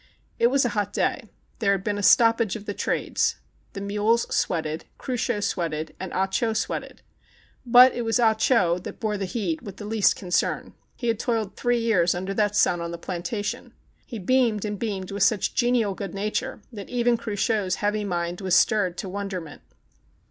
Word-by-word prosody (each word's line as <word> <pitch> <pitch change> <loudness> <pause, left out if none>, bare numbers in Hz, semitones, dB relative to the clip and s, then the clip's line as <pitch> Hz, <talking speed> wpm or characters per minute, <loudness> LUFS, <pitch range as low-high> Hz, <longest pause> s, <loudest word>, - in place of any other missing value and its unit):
It 235 - +5
was 270 +1 +2
a - - +2
hot 205 -1 -2
day. 230 -6 -1 0.3
There 200 -4 +3
had 195 -1 -2
been 205 -1 -1
a - - -2
stoppage 230 -1 +4
of 210 -2 -8
the 205 - -3
trades. - - 0 0.4
The 195 - -6
mules 210 +3 +1
sweated, 160 -2 -1
Cruchot 245 -4 -2
sweated, 160 -5 -2
and 190 -1 -5
Ah 190 - +2
Cho 220 +4 0
sweated. - - -4 0.6
But 250 +2 +8
it 240 - -3
was 225 +1 +1
Ah 225 -2 +5
Cho 215 -6 +2
that 180 - -9
bore 215 -2 -1
the 200 -1 -2
heat 185 -5 -2
with 200 -2 -9
the 205 - -7
least 215 -1 +2
concern. 180 -2 -1 0.2
He 240 - -4
had 225 -2 +1
toiled 225 -5 -1
three 245 0 +1
years 210 -8 +2
under 190 +2 -3
that 210 0 +1
sun 175 -4 +3
on 170 - -4
the 170 - -5
plan 175 0 -5
tation. 205 +3 -4 0.3
He 235 - -8
beamed 225 0 +1
and 205 -1 -4
beamed 195 -5 -3
with 200 0 -4
such 210 +1 +2
genial 240 -4 +2
good 195 -1 -6
nature 215 +6 -3
that 205 -3 -8
even 240 -1 +2
Cruchot's 210 -3 -1
heavy 210 0 -1
mind 175 -2 -3
was 185 -2 +2
stirred 190 -5 +3
to - - -4
wonderment. 185 -5 -5
205 Hz, 190 wpm, -25 LUFS, 185-230 Hz, 0.6 s, But